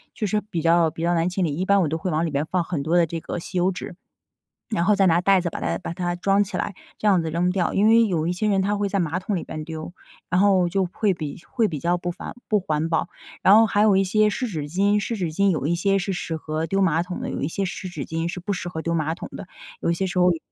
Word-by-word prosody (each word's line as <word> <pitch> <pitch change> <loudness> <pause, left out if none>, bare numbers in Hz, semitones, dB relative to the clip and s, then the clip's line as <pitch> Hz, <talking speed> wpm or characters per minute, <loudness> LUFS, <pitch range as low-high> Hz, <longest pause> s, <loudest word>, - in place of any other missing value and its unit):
就 215 - -2
是 210 +2 0
比 190 -6 -4
较 170 0 +4
比 160 +1 -8
较 175 +1 +2
难 170 +1 +1
清 180 0 0
理， 150 -3 -2
一 180 +4 -2
般 200 0 +4
我 170 - +2
都 160 +2 -2
会 185 - -3
往 160 +2 +1
里 165 - -2
面 140 +1 0
放 180 -2 +1
很 165 -3 -3
多 165 +4 +2
的 170 - +5
这 165 +1 -5
个 160 - -5
吸 180 +2 -6
油 180 +2 +3
纸， 180 -1 -7 0.8
然 210 -6 0
后 210 +3 +4
再 195 -1 +4
拿 170 -1 +4
袋 195 +1 +4
子 175 - -2
把 - - -6
它 - - -1
把 180 - -5
它 175 0 -2
装 195 +3 +2
起 195 -1 -6
来， 195 - -3 0.2
这 - - -2
样 190 -4 +4
子 160 - -3
扔 175 +3 +1
掉。 180 -1 0
因 205 +2 +3
为 230 +1 +6
有 165 -6 -1
一 175 - +1
些 210 +4 -1
人 195 -2 +2
他 205 +2 0
会 205 0 0
在 195 - -1
马 170 -1 0
桶 195 +1 -2
里 170 - -3
边 155 -1 -6
丢， 160 +1 -7 0.4
然 180 - +2
后 190 -3 +4
就 190 +1 0
会 205 -4 +1
比 155 -4 -6
会 225 -3 +1
比 155 - -4
较 170 +5 +1
不 175 0 -3
烦 175 - -7
不 210 - +3
环 155 -3 -1
保。 165 +1 0 0.3
然 195 - +7
后 225 0 +6
还 205 -1 +1
有 210 -3 +5
一 195 - +4
些 215 +3 +3
湿 250 +5 -2
纸 155 -7 -4
巾， 200 +6 +2
湿 225 +3 -2
纸 180 -5 -2
巾 200 +4 +2
有 155 -5 -1
一 170 - +1
些 195 +3 +2
是 195 +1 -2
适 170 -2 -3
合 155 +1 -3
丢 195 +3 +1
马 165 -3 +2
桶 180 +1 -6
的， - - -4
有 - - -4
一 140 - 0
些 195 +4 -2
湿 185 +1 -5
纸 155 -6 -5
巾 165 +1 -3
是 180 - -5
不 195 +4 -3
适 180 -2 -4
合 160 -2 -5
丢 170 +1 -1
马 160 0 0
桶 - - -8
的， - - -8 0.3
有 - - 0
一 - - +2
些 190 +3 -1
时 180 0 -3
候 180 0 +5
有 165 - -4
180 Hz, 330 characters per minute, -23 LUFS, 165-195 Hz, 0.8 s, 然